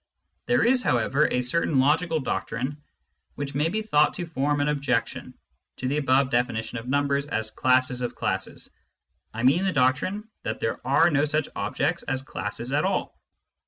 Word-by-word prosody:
There 245 0 +3
is, 250 +1 +4
however, 130 - +2
a 125 - 0
certain 150 +3 0
logical 160 +4 +2
doctrine 130 +2 -3 0.5
which 140 -1 -4
may 150 +4 +1
be 220 +4 -2
thought 150 -8 +3
to 175 - -3
form 145 -2 -1
an 145 - +1
objection 140 -5 -1 0.4
to 130 - -3
the 140 +3 0
above 135 -1 +2
definition 120 -1 -1
of 115 - -11
numbers 140 +1 0
as 110 -5 -2
classes 130 +1 +2
of 120 - -3
classes - - -3 0.3
— - - -50
I 115 - -3
mean 140 +9 +4
the 195 - +1
doctrine 150 - +1
that 110 - -4
there 115 - -2
are 140 +5 +4
no 145 -1 +2
such 155 0 0
objects 145 +12 -1
as 130 -2 -3
classes 120 -1 -5
at 145 +2 +1
all. 190 0 -1
140 Hz, 175 wpm, -25 LUFS, 125-155 Hz, 0.5 s, is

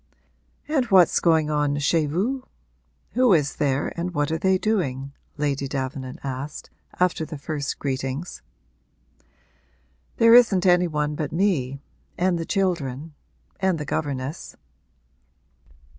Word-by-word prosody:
'And 290 -4 +1
what's 190 -6 +5
going 160 -3 +2
on 145 -1 +1
chez 150 +2 +1
vous 215 - -1 0.7
who 250 -4 +4
is 145 -4 +1
there 140 -1 0
and 175 +1 -4
what 145 +1 0
are 160 - -1
they 190 +1 +3
doing?' 140 -11 -1 0.2
Lady 140 -2 -1
Davenant 130 -1 -4
asked, 135 +2 -6 0.3
after 180 -3 +1
the 155 -1 -6
first 145 -1 -4
greetings. 135 +3 -4 1.8
'There 230 -1 +6
isn't 215 -7 +6
any 180 -1 +4
one 150 -2 -1
but 150 -1 -3
me 150 -8 0 0.4
and 180 -1 +1
the 165 - -3
children 160 -6 -1 0.5
and 190 -3 +1
the 150 - -5
governess.' 140 +1 -4
155 Hz, 125 wpm, -24 LUFS, 140-180 Hz, 1.8 s, There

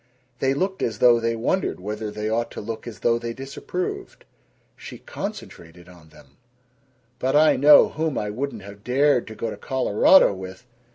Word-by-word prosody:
They 135 0 +1
looked 190 +5 -2
as 110 -3 -2
though 120 +1 +5
they 115 0 -1
wondered 125 - -1
whether 105 +3 -5
they 105 +1 -5
ought 115 +2 -1
to - - -7
look 115 +2 -7
as 110 -5 -9
though 115 0 +2
they 115 0 -5
disapproved. 140 +8 -6 0.5
She - - -10
concentrated 85 +1 -9
on 90 -3 -17
them: - - -20 0.8
"But 130 +2 0
I 155 +1 +5
know 145 +3 +7
whom 155 -2 -3
I 105 0 -3
wouldn't 125 -2 -5
have 100 +1 -12
dared 135 +1 +2
to 110 - -9
go 115 0 -4
to - - -8
Colorado 130 - +4
with! 95 +2 -10
115 Hz, 175 wpm, -23 LUFS, 105-135 Hz, 0.8 s, know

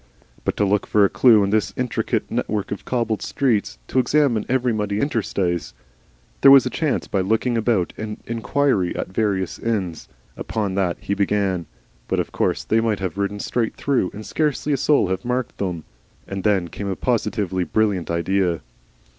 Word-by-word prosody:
But - - -2
to 105 - +2
look 100 +1 +1
for 105 -1 +4
a - - +2
clue 115 -5 +5
in 100 - 0
this 105 -4 0
intricate 125 -1 -1
network 105 -2 -2
of 100 - -5
cobbled 115 -4 -1
streets, 105 - 0
to - - +1
examine 130 -3 +2
every 125 -2 +1
muddy 105 -1 -1
interstice! 95 - -1 0.7
There 140 - +8
was 135 -1 +8
a 125 - -2
chance 155 -3 -1
by 100 - 0
looking 110 +5 +1
about 110 -5 +1
and 105 -1 -5
inquiry 115 -4 0
at - - -3
the - - -17
various 95 -4 -1
inns. 95 -8 -2 0.3
Upon 105 -4 -2
that 95 -3 0
he 100 - -2
began. 100 -3 0 0.4
But - - 0
of - - -2
course - - 0
they 110 +1 +2
might 110 -3 0
have 95 0 -4
ridden 100 +1 -1
straight 115 +2 -1
through 135 -10 0
and 105 +1 -9
scarcely 150 -1 0
a - - +2
soul 145 -6 +3
have 95 0 -2
marked 125 0 -2
them. 90 -5 -3 0.4
And 95 -1 -5
then 95 -5 +2
came 100 - -5
a 95 - -1
positively 105 -6 -1
brilliant 100 -3 0
idea. 85 0 0
105 Hz, 180 wpm, -22 LUFS, 95-120 Hz, 0.7 s, There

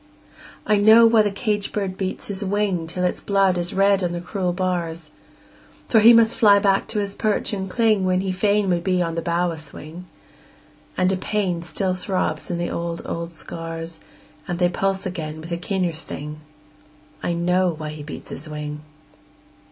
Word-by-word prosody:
I 210 - +3
know 220 +3 +7
why 225 -1 +6
the 210 - +2
caged 205 0 -2
bird 195 -3 -2
beats 190 -1 -4
his 200 0 -4
wing 195 -4 0
Till 180 +2 -3
its 180 - 0
blood 195 -2 +2
is 175 0 -2
red 195 0 +3
on 175 -1 -1
the 175 - -3
cruel 180 +1 -2
bars; 170 -3 -3 0.8
For 225 - +5
he 225 +2 +8
must 230 -1 +5
fly 205 -4 +6
back 195 -1 +2
to 215 - 0
his 200 -1 -2
perch 215 +1 0
and 190 -1 -3
cling 215 -2 +2
When 185 0 +2
he 190 -1 -2
fain 200 +2 +1
would 170 -1 0
be 185 -1 +1
on 165 -1 -3
the 165 - -2
bough 170 +1 0
a 160 - -6
swing; 155 +4 -9 0.9
And 185 +1 +3
a 190 - 0
pain 185 -3 -1
still 185 +2 -2
throbs 185 +1 -2
in 175 - -1
the 175 0 -2
old, 170 0 -4
old 170 0 -4
scars 165 0 -7 0.5
And 175 - -2
they 175 0 +3
pulse 195 +2 -1
again 160 -4 -5
with 165 +2 -9
a 170 - -1
keener 180 -1 -1
sting 150 -1 -6 0.8
I 175 - -1
know 180 +2 +2
why 155 -2 -5
he 150 0 -8
beats 150 +1 -9
his 155 +2 -8
wing! 150 0 -5
185 Hz, 190 wpm, -22 LUFS, 170-200 Hz, 0.9 s, he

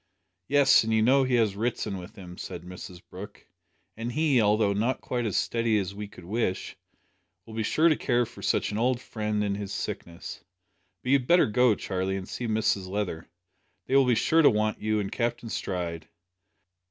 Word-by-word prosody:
"Yes, 140 -4 +5
and 110 - -2
you 110 0 +3
know 135 +4 +5
he 130 -1 +1
has 110 -4 +2
Ritson 110 -2 -2
with 90 +5 -11
him," 90 -3 -10
said - - -7
Mrs 90 0 -10
Brooke; 100 +4 -10 0.5
"and 115 +2 -4
he, 150 -4 +3
although 105 -1 +3
not 115 +6 0
quite 120 -2 -2
as 100 - -1
steady 115 -2 +1
as 100 -1 -2
we 105 +1 -6
could 90 -3 -14
wish, 100 -1 -2 0.7
will 110 - -11
be 110 - -2
sure 155 +9 +3
to 160 - +4
care 120 -3 +1
for 120 - -13
such - - 0
an 105 - -2
old 125 +1 +1
friend 105 -3 -2
in 100 -1 0
his 100 -1 -5
sickness. 85 -3 -6 0.6
But 125 - -1
you'd 135 -3 +3
better 175 0 +6
go, 120 +1 +3
Charlie, 95 0 -2
and 95 - -7
see 120 - -4
Mrs 110 -3 0
Leather. 95 -4 -3 0.6
They 135 - 0
will 135 -2 +5
be 125 - +4
sure 160 +8 +3
to 150 - +7
want 110 0 0
you 110 0 +1
and 100 -2 -3
Captain 120 -1 -2
Stride. 85 -6 -4
110 Hz, 195 wpm, -27 LUFS, 100-120 Hz, 0.7 s, to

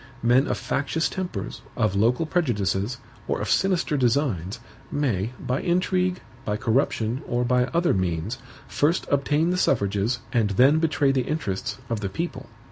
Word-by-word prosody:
Men 125 +4 +4
of - - -1
factious 155 +4 -1
tempers, 115 - -5 0.2
of 105 -5 +1
local 120 +10 +2
prejudices, 115 - 0 0.3
or - - -1
of - - -2
sinister 180 -6 +2
designs, 120 - 0 0.3
may, 120 -6 0
by 125 +2 -2
intrigue, 185 +1 +1 0.2
by 105 -3 -1
corruption, 115 +1 0
or 120 +1 0
by 125 0 +3
other 170 +5 +1
means, 95 +5 -1 0.3
first 160 +5 +1
obtain 150 +4 +2
the 180 - 0
suffrages, 105 - +1 0.2
and 115 -4 +2
then 140 +5 +6
betray 160 -3 +2
the 135 -1 +1
interests, 105 -12 -2
of 115 -3 -2
the 100 -2 -3
people. 140 - -5
130 Hz, 150 wpm, -25 LUFS, 105-155 Hz, 0.3 s, then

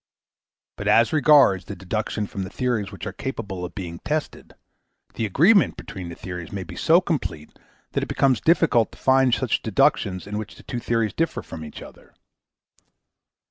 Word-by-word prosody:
But - - -5
as 115 +6 +4
regards 140 - +5
the - - -7
deductions 105 +2 -3
from 100 - -4
the 95 - -6
theories 110 -4 -2
which 100 - -8
are - - -5
capable 100 -8 -5
of 90 - -7
being 85 -4 -6
tested, 150 0 -4 0.6
the 110 - -2
agreement 175 - +4
between 90 -4 -8
the 85 - -8
theories 90 -2 -7
may 100 -2 -4
be - - -10
so 170 +3 +4
complete 140 - -3 0.4
that - - -1
it - - -3
becomes 130 -5 +2
difficult 160 -9 +3
to - - -14
find 130 -2 +3
any - - -2
deductions 95 -2 +1
in 105 +1 -4
which 110 -1 -8
the - - -15
two 120 - -4
theories 115 -3 0
differ 165 0 -1
from 80 - -8
each 75 - -9
other. - - -16
110 Hz, 180 wpm, -23 LUFS, 95-135 Hz, 0.6 s, regards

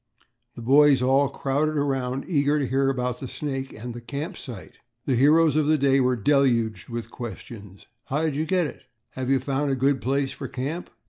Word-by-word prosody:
The 120 - -8
boys 140 +1 +5
all 135 +2 +3
crowded 145 +3 -1
around, 135 -2 -1
eager 145 -3 +2
to 145 - 0
hear 135 +1 +1
about 125 -2 -2
the 130 - -6
snake 135 -1 -4
and 120 +2 -7
camp 150 +7 -4
site. 120 - -10 0.3
The 135 - +1
heroes 150 +4 +4
of 155 -1 +2
the 155 0 +4
day 135 -1 +3
were 125 -1 +2
deluged 115 -4 +1
with 115 0 -5
questions. 105 -4 -9 0.2
"How 150 +4 -1
did 155 -3 0
you 155 +2 -1
get 180 -1 +2
it?" 140 - -8 0.3
"Have 130 0 -4
you 135 -1 +3
found 140 +2 -1
a 135 - +1
good 135 +1 +1
place 135 +1 0
for 140 - -6
camp?" 145 +9 -5
135 Hz, 195 wpm, -25 LUFS, 125-145 Hz, 0.3 s, boys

